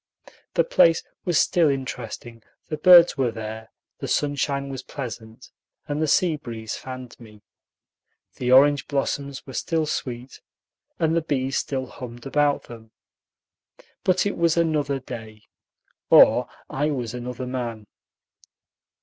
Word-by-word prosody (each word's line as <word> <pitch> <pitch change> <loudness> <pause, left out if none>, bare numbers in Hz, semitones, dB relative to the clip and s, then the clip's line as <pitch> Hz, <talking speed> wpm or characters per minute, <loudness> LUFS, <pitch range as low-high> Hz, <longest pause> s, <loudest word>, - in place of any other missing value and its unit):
The - - +4
place 170 - +4 0.2
was 175 -4 +1
still 165 -4 +3
interesting, 120 -3 -5 0.3
the 155 - -3
birds 175 +1 +7
were 130 -2 +2
there, 110 0 -7 0.3
the - - -5
sunshine 140 -1 -1
was 135 -1 -5
pleasant, 115 -3 -8 0.4
and 145 0 -2
the 155 - +1
sea 165 +1 +2
breeze 115 -5 -6
fanned 130 -2 -9
me. 105 -3 -15 0.9
The 125 -1 -1
orange 140 +1 +5
blossoms 140 -1 -3
were 130 - -10
still 160 +4 -1
sweet, 125 -3 -5 0.6
and 160 0 +1
the 165 - +2
bees 135 -4 -1
still 130 -2 -3
hummed 120 -1 -10
about 145 +1 +1
them; 115 -2 -12 1.1
but 185 +1 +2
it 205 - -2
was 170 0 +2
another 150 -4 +1
day, 110 -4 -9 0.7
or - - +6 0.2
I 145 +3 -1
was 125 -5 -3
another 125 0 -5
man. 120 -4 -4
135 Hz, 130 wpm, -24 LUFS, 120-150 Hz, 1.1 s, birds